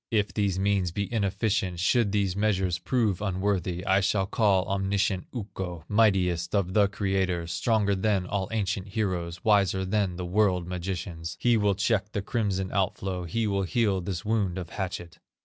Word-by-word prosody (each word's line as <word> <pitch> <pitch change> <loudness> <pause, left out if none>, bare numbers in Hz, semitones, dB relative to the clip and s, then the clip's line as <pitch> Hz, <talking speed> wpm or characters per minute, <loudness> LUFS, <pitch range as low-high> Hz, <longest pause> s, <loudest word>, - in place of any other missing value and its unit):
"If 105 -2 0
these 100 -3 0
means 95 -2 +1
be 100 +5 -3
inefficient, 100 -3 0
Should 100 +4 +2
these 100 -3 0
measures 95 -4 +1
prove 110 -8 0
unworthy, 95 -2 -1
I 95 0 +4
shall 95 0 +1
call 100 -2 +2
omniscient 95 -1 0
Ukko, 95 -7 -6
Mightiest 95 -5 +2
of 95 -2 0
the 105 -1 +5
creators, 95 -4 -1
Stronger 105 +3 +1
than 100 -1 +1
all 95 0 -2
ancient 105 -3 -1
heroes, 90 -5 -2
Wiser 100 -3 +3
than 95 -2 0
the 90 0 -4
world 90 -1 +2
magicians; 90 -2 -4
He 120 -1 +3
will 105 -2 +2
check 100 +1 0
the 100 - -2
crimson 95 -4 -1
out 95 -2 0
flow, 90 -2 -4
He 110 +7 -1
will 100 -2 0
heal 95 +1 +1
this 90 0 -4
wound 105 -4 0
of 90 -3 -6
hatchet. 90 -3 -5
95 Hz, 165 wpm, -27 LUFS, 90-105 Hz, -, the